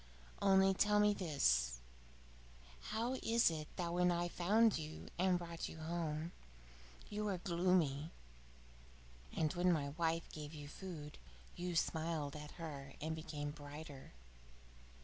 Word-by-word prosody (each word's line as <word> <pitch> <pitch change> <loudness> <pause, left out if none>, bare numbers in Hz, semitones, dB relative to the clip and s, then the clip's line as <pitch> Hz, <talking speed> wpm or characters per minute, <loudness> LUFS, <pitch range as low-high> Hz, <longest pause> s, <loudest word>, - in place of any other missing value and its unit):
Only 195 -1 +6
tell 210 +2 +4
me 210 0 +5
this: 65 - +2 1.1
how 235 +4 0
is 230 -5 +4
it 155 -2 -4
that 170 -1 -2
when 180 0 +4
I 175 0 0
found 210 +4 +4
you 155 0 -7
and 185 0 +4
brought 170 -1 -5
you - - -9
home, 160 0 -2 0.8
you 210 +1 -1
were 200 -3 0
gloomy, 170 -5 +2 1.2
and 155 -2 0
when 180 0 +3
my 145 -4 +1
wife 165 +2 0
gave 150 0 -7
you 145 -1 -7
food 150 -2 -7 0.4
you 175 0 -3
smiled 160 -3 0
at 150 0 -7
her 140 -5 -6
and 160 +1 -2
became 150 -2 -4
brighter? 145 - -9
165 Hz, 130 wpm, -38 LUFS, 150-180 Hz, 1.2 s, Only